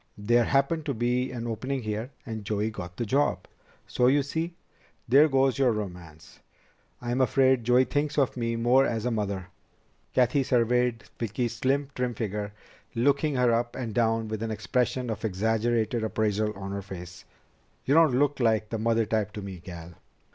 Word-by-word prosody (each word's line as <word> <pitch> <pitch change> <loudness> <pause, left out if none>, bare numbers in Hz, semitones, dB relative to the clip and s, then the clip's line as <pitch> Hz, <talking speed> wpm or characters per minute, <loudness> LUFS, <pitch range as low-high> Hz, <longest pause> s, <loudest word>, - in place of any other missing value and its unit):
There 120 +3 +3
happened 140 +4 +1
to 140 - -1
be 125 +2 0
an 120 -2 -5
opening 125 +3 -3
here, 110 +3 -3 0.2
and 110 -4 -5
Joey 105 +1 -1
got 90 -4 -8
the 120 - -2
job. 115 -6 +1 0.4
So, 125 - +1
you 140 +2 +4
see, 165 +4 -3 0.5
there 140 +6 +6
goes 135 -1 +2
your 130 -3 +4
romance. 90 -6 -7 0.6
I'm 120 +2 0
afraid 130 0 +3
Joey 125 +2 +4
thinks 145 +2 -1
of 135 -3 +2
me 115 -1 -1
more 120 +3 +4
as 115 -4 -1
a 125 - +1
mother." 100 -4 -3 0.7
Cathy 125 +2 +3
surveyed 125 -2 +1 0.2
Vicki's 115 +1 -2
slim, 140 +1 0
trim 125 -2 -2
figure, 105 -1 -3 0.4
looking 140 +4 +2
her 125 -2 +3
up 120 +1 -1
and 120 -4 -4
down 115 -1 +1
with 110 0 -4
an 115 - -2
expression 125 +3 -1
of 110 0 -5
exaggerated 110 +2 0
appraisal 110 -1 0
on 95 0 -6
her 100 0 -3
face. 90 -2 -9 0.6
"You 135 - +2
don't 155 -5 +5
look 145 +1 +1
like 110 -3 +2
the 115 - -3
mother 115 0 +2
type 110 -1 -1
to 105 - -6
me, 95 -2 -7
gal." 85 -1 -9
115 Hz, 175 wpm, -27 LUFS, 105-130 Hz, 0.7 s, there